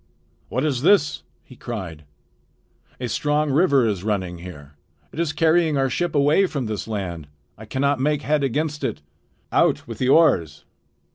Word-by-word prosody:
"What 130 +5 -1
is 135 -5 -1
this?" 155 -2 +3 0.2
he 130 - -16
cried. 95 -12 -7 0.9
"A 125 - -3
strong 150 +5 0
river 140 -4 +3
is 100 -4 -2
running 95 -5 -2
here. 75 -5 -11 0.4
It - - -7
is 170 -3 0
carrying 160 -1 +2
our 135 -1 +1
ship 175 +3 -2
away 150 +7 +4
from 140 -7 -3
this 110 -1 -4
land. 90 -8 -5 0.3
I 110 - -12
cannot 140 +4 0
make 150 +2 0
head 150 -1 +1
against 150 +3 -2
it. - - -3 0.5
Out - - +2
with - - -8
the 130 - +1
oars!" 130 - +3
135 Hz, 160 wpm, -22 LUFS, 105-150 Hz, 0.9 s, away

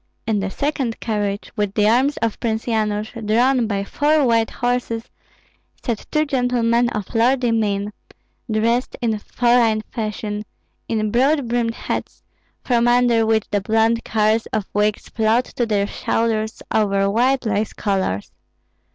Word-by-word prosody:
In 215 -2 +1
the 195 0 -2
second 270 -1 -2
carriage, 205 -2 -2
with 205 -2 -1
the 210 -1 +3
arms 260 +6 +3
of 225 -2 -1
Prince 220 -1 -2
Yanush, 215 -2 -1
drawn 240 +3 +2
by 200 -2 -1
four 295 +7 +2
white 230 -2 +2
horses, 245 -2 -2 0.8
sat 235 -4 -3
two 305 0 +1
gentlemen 245 -3 +1
of 210 -4 -5
lordly 245 +1 +2
mien, 205 -2 0 0.6
dressed 230 +3 0
in 225 -3 -1
foreign 235 -1 +2
fashion, 210 -1 -3 0.5
in 215 -2 0
broad 270 +3 +2
brimmed 230 -1 0
hats, - - -5 0.4
from 240 -2 +2
under 240 -2 +3
which 220 -1 +2
the 205 -1 +1
blond 225 +3 +2
curls 220 +1 +1
of 215 -3 -2
wigs 210 0 0
flowed 225 +3 +1
to 240 - -3
their 205 -2 +1
shoulders 220 +1 -1
over 200 -2 +2
wide 250 +5 +2
lace 215 0 0
collars. 190 - -2
225 Hz, 145 wpm, -21 LUFS, 210-240 Hz, 0.8 s, the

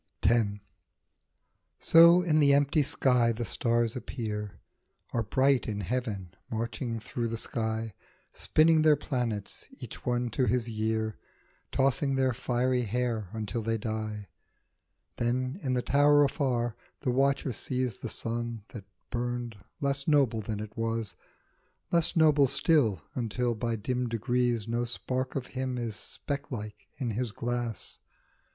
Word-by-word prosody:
X. 115 +2 +4 1.3
SO 170 +2 +7
in 155 -3 +3
the 140 -1 +6
empty 145 +2 +3
sky 125 -4 +3
the 115 +1 -3
stars 115 -1 +1
appear, 105 -4 -5 0.5
Are 115 - +1
bright 130 +4 +2
in 105 -2 -2
heaven 100 -4 -3 0.2
marching 115 +1 -3
through 115 +2 -3
the 115 0 -3
sky, 110 -1 -3 0.4
Spinning 160 0 +4
their 155 -1 +6
planets, 120 -8 -3
each - - -9
one 120 -1 0
to 125 +3 +1
his 120 -1 +1
year, 110 -1 -2 0.5
Tossing 135 +1 +2
their 130 -1 +2
fiery 125 +1 0
hair 115 -3 -1
until 110 +1 -3
they 115 +1 0
die; 110 -1 -4 0.9
Then 130 +6 -1
in 130 -2 0
the 125 - 0
tower 145 +1 +5
afar 125 -5 0 0.3
the 130 - 0
watcher 135 0 +1
sees 125 -1 -1
The - - -6
sun, 115 -1 -3
that 105 -5 -9 0.3
burned, 120 -1 -3 0.3
less 140 -1 -1
noble 135 -8 +3
than 105 0 -4
it 105 0 -7
was, 115 -2 -2 0.8
Less 170 -2 +2
noble 150 -4 +5
still, 135 - +2
until 120 0 -1
by 115 +1 -2
dim 125 +3 -2
degrees 120 0 0
No 120 +1 0
spark 125 +2 -3
of 135 -3 -2
him 130 -1 -2
is 115 -2 -3
specklike 130 -5 -6
in 125 -5 -2
his 115 +1 -2
glass. 120 -2 -4
120 Hz, 135 wpm, -29 LUFS, 115-135 Hz, 1.3 s, SO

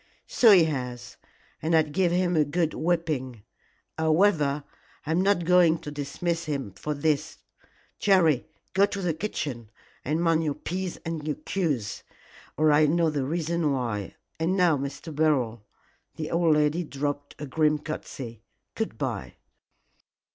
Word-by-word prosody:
"So 235 - +4
he 190 -5 +8
has, 125 -5 -4 0.4
and 165 +2 +1
I'd 155 -2 +3
give 175 +2 +2
him 180 0 +1
a 155 - +5
good 160 +2 0
whipping. 155 -9 -1 0.6
However, 155 -3 +2 0.4
I 155 - -2
am 170 +3 +2
not 195 -3 +2
going 175 -2 +5
to 150 - -8
dismiss 165 +4 -3
him 140 -9 -3
for 150 +10 -4
this. 155 +1 0 0.6
Jerry, 170 -9 +3 0.3
go 195 +1 +4
to 200 - -5
the 180 -4 0
kitchen 145 - -4 0.3
and 155 +4 -1
mind 165 -1 +2
your 150 -2 -1
P's 185 0 -4
and 155 -2 -4
Q's, 145 - -1 0.6
or 155 0 +4
I'll 150 +1 +5
know 165 +1 +2
the 145 -3 -1
reason 165 0 0
why. 115 -7 -3 0.2
And 175 +4 +1
now, 175 -4 +4
Mr. 140 +3 -6
Beryl" 125 -8 +1 0.5
the 155 -1 -5
old 165 -2 +3
lady 150 +3 +2
dropped 145 -1 -4
a 150 - -6
grim 150 +2 +2
curtsey 135 -6 -7 0.3
"good - - -3
bye." - - -4
155 Hz, 145 wpm, -26 LUFS, 145-170 Hz, 0.6 s, he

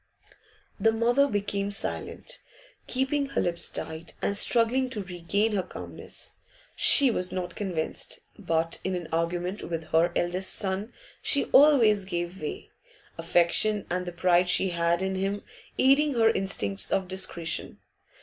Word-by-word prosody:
The 225 - +4
mother 240 +5 +2
became 200 -2 -2
silent, 200 - -4 0.5
keeping 275 +2 0
her 275 - -1
lips 170 -1 +2
tight, 160 +1 -4
and 200 - -1
struggling 240 +4 +2
to 215 -5 -4
regain 190 +4 -1
her 200 -2 0
calmness. - - -7 0.4
She 275 -3 +7
was 180 -4 -2
not 180 -1 -4
convinced, 180 -6 -4
but 165 -4 -1
in 180 -3 -3
argument 175 +4 -2
with 165 -1 -5
her 165 +2 +3
eldest 180 +2 +1
son 200 +3 -2 0.3
she 280 - +1
always 235 -9 +5
gave 175 0 -4
way, 150 - -6 0.5
affection 175 +5 +2
and 180 0 -2
the - - -3
pride 180 +1 +2
she 190 +1 +3
had 170 +1 0
in 190 0 -1
him 195 +2 -2 0.3
aiding 275 +1 +3
her 225 -1 +4
instincts 195 0 -1
of 190 -1 0
discretion. 180 -3 -2
190 Hz, 140 wpm, -27 LUFS, 175-220 Hz, 0.5 s, She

